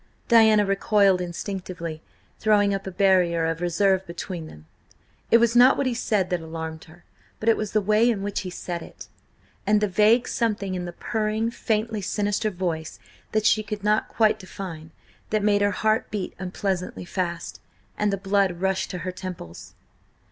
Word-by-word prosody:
Diana 220 Hz, -3 st, +6 dB
recoiled 195 Hz, -1 st, +3 dB
instinctively, 175 Hz, -2 st, -5 dB, 0.4 s
throwing 205 Hz, -2 st, +3 dB
up 195 Hz, 0 st, -4 dB
a -, -, -4 dB
barrier 180 Hz, -3 st, +3 dB
of 165 Hz, +1 st, -2 dB
reserve 190 Hz, +2 st, +2 dB
between 170 Hz, -1 st, -6 dB
them. 75 Hz, -, -14 dB, 0.6 s
It 230 Hz, -, +7 dB
was 235 Hz, 0 st, +2 dB
not 250 Hz, +2 st, +7 dB
what 280 Hz, -, 0 dB
he 255 Hz, -, +1 dB
said 210 Hz, -5 st, 0 dB
that 180 Hz, -2 st, 0 dB
alarmed 160 Hz, 0 st, -6 dB
her, 170 Hz, +2 st, -18 dB, 0.4 s
but 220 Hz, -, -6 dB
it 225 Hz, -, +6 dB
was 215 Hz, -2 st, -4 dB
the 215 Hz, -, +3 dB
way 215 Hz, +4 st, +3 dB
in 205 Hz, -4 st, -1 dB
which 205 Hz, 0 st, -2 dB
he 185 Hz, -, -5 dB
said 175 Hz, -1 st, -5 dB
it, -, -, -12 dB, 0.6 s
and 210 Hz, 0 st, +4 dB
the 210 Hz, -, +1 dB
vague 215 Hz, +5 st, +3 dB
something 205 Hz, -5 st, -1 dB
in 180 Hz, -1 st, -3 dB
the 175 Hz, -, -5 dB
purring, 220 Hz, +4 st, -2 dB
faintly 220 Hz, -1 st, -1 dB
sinister 205 Hz, +2 st, -1 dB
voice 175 Hz, -4 st, -4 dB, 0.3 s
that 215 Hz, 0 st, 0 dB
she 215 Hz, -, +4 dB
could 210 Hz, -1 st, -6 dB
not 210 Hz, +1 st, +1 dB
quite 215 Hz, -1 st, +2 dB
define, 180 Hz, -5 st, -8 dB, 0.4 s
that 215 Hz, -1 st, 0 dB
made 205 Hz, -1 st, +3 dB
her 205 Hz, -, +3 dB
heart 215 Hz, +2 st, 0 dB
beat 205 Hz, -3 st, -4 dB
unpleasantly 185 Hz, -1 st, -3 dB
fast, 175 Hz, -2 st, -4 dB, 0.3 s
and 210 Hz, -1 st, 0 dB
the 195 Hz, -, -1 dB
blood 195 Hz, -2 st, +1 dB
rush 190 Hz, 0 st, 0 dB
to 180 Hz, -, -5 dB
her 185 Hz, -, -2 dB
temples. 180 Hz, -, -9 dB
195 Hz, 175 wpm, -24 LUFS, 180-215 Hz, 0.6 s, It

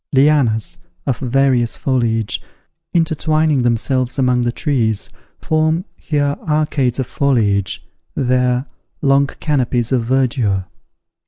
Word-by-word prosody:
Lianas, 130 Hz, -6 st, +3 dB, 0.3 s
of 130 Hz, -4 st, -1 dB
various 130 Hz, -2 st, +1 dB
foliage, 115 Hz, -5 st, 0 dB, 0.5 s
intertwining 155 Hz, -3 st, +1 dB
themselves 120 Hz, +2 st, 0 dB
among 125 Hz, -2 st, +2 dB
the 120 Hz, 0 st, 0 dB
trees, 115 Hz, -7 st, -1 dB, 0.3 s
form, 160 Hz, +3 st, 0 dB
here, 145 Hz, -3 st, -1 dB
arcades 150 Hz, -5 st, +1 dB
of 130 Hz, -, -1 dB
foliage, 105 Hz, -9 st, 0 dB, 0.3 s
there, 125 Hz, -1 st, +1 dB, 0.4 s
long 140 Hz, 0 st, +4 dB
canopies 125 Hz, -5 st, -1 dB
of 125 Hz, -3 st, +2 dB
verdure. 120 Hz, -7 st, +1 dB
130 Hz, 100 wpm, -18 LUFS, 120-145 Hz, 0.5 s, long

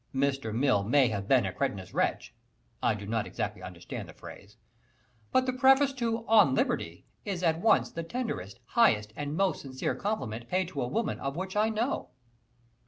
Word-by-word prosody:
Mr. 135 Hz, -4 st, 0 dB
Mill 120 Hz, -3 st, +2 dB
may 125 Hz, +4 st, +4 dB
have 100 Hz, -2 st, -3 dB
been 125 Hz, -3 st, +4 dB
a 95 Hz, -, -3 dB
cretinous 95 Hz, -1 st, -3 dB
wretch -, -, -1 dB, 0.5 s
(I -, -, +2 dB
do 105 Hz, -1 st, -7 dB
not 110 Hz, 0 st, -1 dB
exactly -, -, -4 dB
understand -, -, -7 dB
the -, -, -12 dB
phrase), 100 Hz, +3 st, -12 dB, 0.7 s
but 255 Hz, -, +3 dB
the 255 Hz, -, 0 dB
preface 270 Hz, +2 st, +5 dB
to 230 Hz, -3 st, -2 dB
"On 210 Hz, -12 st, +6 dB
Liberty" 85 Hz, -7 st, -1 dB, 0.2 s
is 190 Hz, -4 st, -3 dB
at 165 Hz, -1 st, +2 dB
once 220 Hz, -, +3 dB
the 165 Hz, -, -4 dB
tenderest, 165 Hz, -, -4 dB
highest 105 Hz, -, +3 dB
and 145 Hz, +1 st, -4 dB
most 195 Hz, -4 st, +1 dB
sincere 130 Hz, -2 st, -3 dB
compliment 120 Hz, -, -3 dB
paid 185 Hz, -1 st, 0 dB
to 185 Hz, -, -4 dB
a 120 Hz, -, -1 dB
woman, 230 Hz, -, -1 dB
of 135 Hz, 0 st, -3 dB
which 190 Hz, +3 st, -4 dB
I 215 Hz, +1 st, +3 dB
know. 225 Hz, +4 st, -2 dB
145 Hz, 180 wpm, -29 LUFS, -, 0.7 s, On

